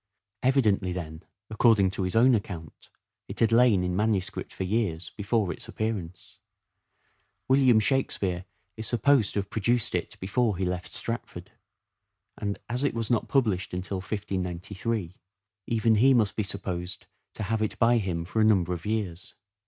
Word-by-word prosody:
Evidently 110 -8 +2
then, 80 -3 -6 0.3
according 110 -3 +4
to 95 - -4
his 90 +1 -1
own 125 +3 +6
account, 90 -7 -4 0.4
it - - -7
had 115 0 +3
lain 115 -5 +5
in 90 0 -1
manuscript 105 -2 -1
for - - -4
years 95 -4 -1
before 100 -3 -1
its - - -10
appearance. 95 -6 -5 1.1
William 130 -4 +5
Shakspere 100 -7 0 0.3
is 110 0 -4
supposed 125 -2 +3
to 100 - +2
have 100 - -13
produced 115 +1 0
it - - -3
before 105 +1 0
he 95 - -1
left 90 0 -3
Stratford, - - -4 0.8
and, 100 -1 -3
as 125 +3 -2
it 140 - 0
was 115 -1 -2
not 115 - +1
published 100 -9 0
until 90 +2 -3
1593, 95 0 -3 0.5
even 115 -1 +2
he 130 +5 +5
must 110 -4 +2
be - - 0
supposed 95 -3 -5 0.3
to - - -4
have 110 +2 -1
it 110 - -1
by 120 +1 +4
him 90 -6 -2
for 110 +5 -1
a - - +5
number 95 -5 +3
of 85 +2 -6
years. 100 -5 -3
105 Hz, 160 wpm, -27 LUFS, 90-115 Hz, 1.1 s, own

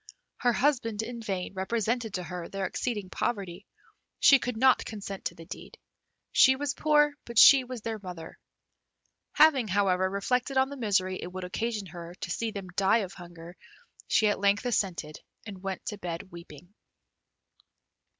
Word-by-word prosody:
Her 245 - +2
husband 235 -5 0
in 235 +1 -7
vain 195 -4 -4
represented 225 +3 -2
to 180 - -3
her 175 -1 -7
their 195 -1 -3
exceeding 205 -2 -3
poverty; 200 -4 -3 0.5
she 275 - +7
could 250 -3 -4
not 260 +2 +4
consent 200 -2 -7
to - - -3
the 165 - -12
deed. - - -10 0.5
She 265 - +6
was 285 0 -2
poor, 295 -1 +3
but 235 -1 -9
she 270 +3 +9
was 250 -2 -7
their 225 -1 -4
mother. 180 -4 -9 0.9
Having, 285 -7 +5
however, 190 -1 +1
reflected 250 +7 -1
on 265 0 +3
the 280 - -7
misery 190 -6 0
it 180 - -6
would 185 0 -6
occasion 215 +3 -3
her 170 0 -9
to - - -4
see 230 - -2
them 200 -4 -7
die 195 +5 +2
of 185 - -12
hunger, 175 -1 -12 0.5
she 215 - +3
at 205 - 0
length 200 +3 +2
assented, 180 -10 -2 0.3
and 195 -4 -9
went 195 -1 -5
to 210 - -5
bed 175 0 -6
weeping. 170 +1 -13
200 Hz, 165 wpm, -28 LUFS, 185-240 Hz, 0.9 s, she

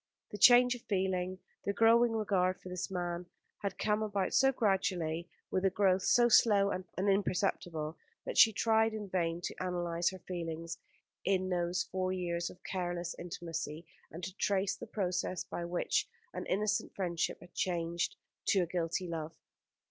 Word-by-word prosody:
The 205 - -5
change 245 +3 +8
of 245 - -8
feeling, 185 -3 -1 0.3
the 200 - -1
growing 230 +2 +5
regard 190 -4 +1
for 185 - -10
this 180 +1 -4
man, 175 -1 -3 0.3
had 200 -2 -3
come 210 0 +1
about 205 -3 -1
so 270 0 +5
gradually, 180 -7 0 0.2
with 185 - 0
a 195 - +4
growth 190 -1 +2
so 240 +5 +5
slow 205 -4 +5
and 185 0 -3
imperceptible, 185 -5 0 0.3
that - - -4
she 225 - +8
tried 220 +1 +2
in 210 -2 -5
vain 170 -2 -1
to - - -3
analyse 175 -2 0
her 190 - -8
feelings 165 -2 -5 0.4
in 185 -1 +1
those 175 0 0
four 185 0 -2
years 175 -2 -2
of 180 - -15
careless 175 -2 -3
intimacy, 165 -2 -5 0.2
and 170 +3 -9
to 185 +1 -5
trace 195 -1 +1
the 240 - -9
process 185 -3 -2
by 170 - -5
which 175 0 0 0.3
an - - -5
innocent 210 +2 0
friendship 175 -4 -1
had 175 - -15
changed 170 -1 -1 0.3
to 195 - +4
a - - +1
guilty 175 +1 -2
love. 160 -2 -4
185 Hz, 165 wpm, -33 LUFS, 175-200 Hz, 0.4 s, change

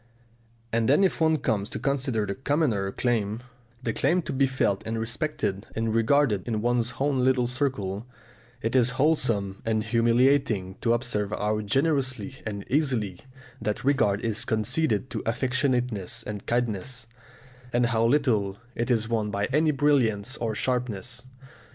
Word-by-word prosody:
And 115 0 +2
then 145 +8 +5
if 190 - +1
one 160 0 +4
comes 110 -7 -1
to - - -5
consider 130 -6 0
the 100 - -2
commoner 130 -7 0
claim, 110 -1 -1 0.4
the 115 - -1
claim 170 +10 +1
to - - -4
be 135 +1 +3
felt 115 -7 0
and 115 0 -3
respected 115 - -2
and 110 0 -1
regarded 115 -3 +2
in 110 -3 -1
one's 120 0 +1
own 135 -2 +1
little 130 -1 +3
circle, 120 -5 -2 0.6
it 115 +3 -1
is 125 -1 +4
wholesome 115 -10 +1
and 110 -1 0
humiliating 115 -3 +2
to 115 - +3
observe 120 -4 -1
how 105 0 -1
generously 130 +1 0
and 100 -1 -5
easily 125 - 0 0.4
that 105 0 -2
regard 120 -7 +2
is 110 -2 -1
conceded 110 +2 0
to 110 - -3
affectionateness 125 -3 0
and 105 -1 -6
kindness, 120 0 -1 0.7
and 120 0 +2
how 115 -1 +1
little 115 -7 +2 0.2
it 120 +2 -2
is 115 -3 +2
won 110 -2 0
by 100 0 -1
any 155 +2 +3
brilliance 130 -6 +2
or 110 -2 -2
sharpness. 125 0 -2
120 Hz, 150 wpm, -26 LUFS, 105-130 Hz, 0.7 s, then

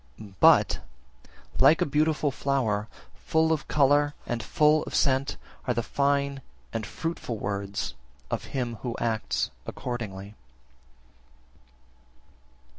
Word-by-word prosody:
52. 100 -3 -12
But, - - +6 0.8
like 160 - +6
a - - +2
beautiful 150 0 +1
flower, 120 -7 0 0.3
full 160 0 +1
of 155 - -3
colour 145 0 +3
and 120 -1 -2
full 150 +4 +3
of - - -5
scent, 135 0 +2 0.3
are 125 - +1
the 120 - 0
fine 140 0 0 0.3
and 110 -2 -3
fruitful 165 -8 -4
words 100 -1 -3 0.4
of - - -2
him 120 -4 -3
who 120 -3 -3
acts 115 -2 -1 0.2
accordingly. 105 -5 -5
130 Hz, 115 wpm, -27 LUFS, 110-145 Hz, 0.8 s, But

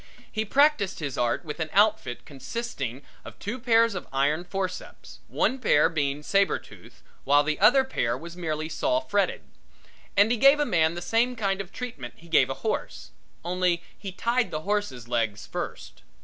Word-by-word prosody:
He 220 0 -2
practiced 275 -5 +3
his 145 -5 -4
art 120 +7 0
with 150 +1 -6
an 160 -1 -2
outfit 205 - +2
consisting 140 - -5 0.2
of - - -11
two 225 +6 -5
pairs 230 -2 +3
of 180 - -6
iron 145 +5 +1
forceps 185 0 -6
one 265 - 0
pair 155 -10 +4
being 145 -3 -1
saber 195 +1 +2
toothed - - -16 0.2
while 145 +1 +4
the 155 0 -2
other 240 +7 +6
pair 120 - -1
was 170 +4 -10
merely 155 -3 -3
saw 315 - 0
fretted 205 -11 0 0.8
and 205 +3 +5
he 240 - +2
gave 275 +4 +6
a 295 - +2
man 165 - +2
the 175 - -5
same 235 +6 +1
kind 195 -3 -1
of 195 -1 -10
treatment 190 - -7
he 170 - -17
gave 165 - +4
a - - -2
horse, - - -3 0.3
only 180 -1 0
he 195 -2 -7
tied 235 +5 0
the 155 - -4
horse's 200 - -2
legs 115 -4 -1
first. - - -6
180 Hz, 175 wpm, -26 LUFS, 150-225 Hz, 0.8 s, other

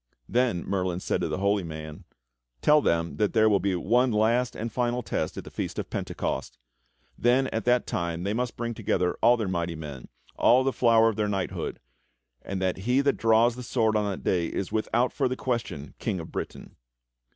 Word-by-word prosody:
Then 120 -8 +1
Merlin 90 -2 -1
said - - -1
to - - 0
the - - -2
Holy 100 +1 +1
Man: 80 -2 -8 0.6
"Tell 150 0 +6
them 85 -5 0
that 105 -2 +1
there 110 -1 +5
will 100 -2 +4
be 95 -1 0
one 120 +8 +2
last 115 +3 +2
and 115 +1 -4
final 120 +1 -1
test - - -3
at - - -5
the - - -11
Feast - - -4
of - - -4
Pentecost. - - -3 0.6
That 130 +2 +2
at 115 - -2
that 125 0 +3
time 85 0 -2
they 100 +2 -1
must 125 +1 -2
bring 120 0 -2
together 95 -5 0
all 120 +2 +6
their 110 -4 -2
mighty 85 -2 -2
men, 75 -5 -8 0.3
all 125 +2 +5
the 135 0 0
flower 115 -2 +4
of 110 - -4
their 105 -1 0
knighthood, 95 -2 -3 0.6
and 95 - -4
that 95 -1 0
he 125 +8 +2
that 140 0 +1
draws 115 +1 +4
the 125 - -7
sword 115 -3 +1
on 105 -1 +1
that 95 - -5
day 85 -3 +1
is 95 - -4
without 120 +3 +1
further 130 -3 0
question 120 - -3
King 95 - -2
of 80 - -8
Britain." - - -7
110 Hz, 200 wpm, -27 LUFS, 95-120 Hz, 0.6 s, Tell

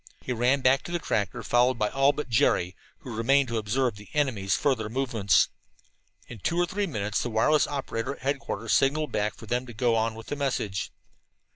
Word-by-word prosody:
He 130 - -2
ran 125 +4 +2
back 130 +2 +4
to - - -6
the 175 - 0
tractor, 115 - -2
followed 125 +1 +3
by 105 -2 +1
all 135 +1 +3
but 150 - -5
Jerry, 95 -6 +2 0.3
who 120 -4 -7
remained 135 +4 +3
to 115 -1 -1
observe 115 +1 0
the 105 0 -13
enemy's 115 -10 +1
further 115 -7 0
movements. 115 - +2 0.8
In 115 - -10
two 170 - -1
or 175 - +3
three 200 +3 -2
minutes 105 - -2
the 120 - -2
wireless 120 +7 +3
operator 135 -2 -3
at - - -18
headquarters 140 +1 -2
signaled 150 +3 +2
back 105 0 -1
for - - -12
them 125 +3 -2
to 120 - -9
go 120 +1 +2
on 115 0 0
with 115 0 -10
the - - -4
message. 125 -9 -2
120 Hz, 200 wpm, -27 LUFS, 110-140 Hz, 0.8 s, back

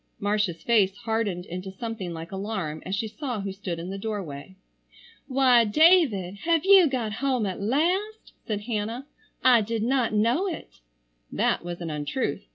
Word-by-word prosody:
Marcia's 205 -4 -1
face 205 -4 +3
hardened 220 -6 -2
into 185 +2 -6
something 195 -2 -5
like 165 0 -7
alarm 190 -6 -4
as 190 - -1
she 220 +2 -2
saw 245 +1 -4
who 195 0 -4
stood 190 -3 -5
in 170 +3 -6
the 195 - -5
doorway. 190 -6 -5 0.7
"Why, 255 -3 +5
David, 225 - +4
have 330 - +1
you 390 -3 +7
got 245 -6 -2
home 255 -1 0
at 190 0 -4
last?" 360 - -1
said 210 -2 -2
Hannah. 225 +3 -3 0.4
"I 245 -3 +6
did 220 +1 -2
not 250 -1 +1
know 235 - +2
it." 335 - -7 0.5
That - - 0
was 175 0 -6
an 165 -2 -4
untruth. 150 - -3
215 Hz, 165 wpm, -26 LUFS, 190-255 Hz, 0.7 s, you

